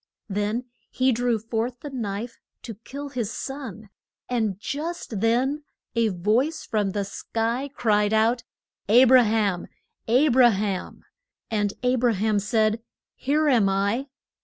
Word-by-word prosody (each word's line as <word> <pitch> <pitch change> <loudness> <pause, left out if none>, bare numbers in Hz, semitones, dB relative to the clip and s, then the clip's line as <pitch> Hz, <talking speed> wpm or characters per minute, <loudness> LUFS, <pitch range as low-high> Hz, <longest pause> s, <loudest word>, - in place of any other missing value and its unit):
Then 210 +4 -1 0.3
he 260 +1 +2
drew 240 0 +1
forth 225 +3 -3
the 290 - -7
knife 230 -2 -4 0.2
to 230 - -6
kill 275 +7 -8
his 240 -6 -3
son. 230 -8 -7 0.4
And 220 -6 -1
just 295 - -4
then 255 +7 +1 0.3
a 230 -1 +3
voice 220 - 0
from 210 -3 0
the 200 +1 -2
sky 230 +6 -2
cried 210 -6 +1
out, 225 +2 +2 0.5
A 240 +4 +8
bra 255 0 +7
ham! 210 -5 0 0.4
A 255 +7 +4
bra 250 -1 +6
ham! 200 -3 -3 0.5
And 205 -2 0
A 250 +1 +2
bra 240 -1 +2
ham 210 +1 +1
said, 215 +1 +1 0.3
Here 300 +3 0
am 230 -8 +4
I. 200 +7 0
225 Hz, 140 wpm, -25 LUFS, 210-255 Hz, 0.5 s, A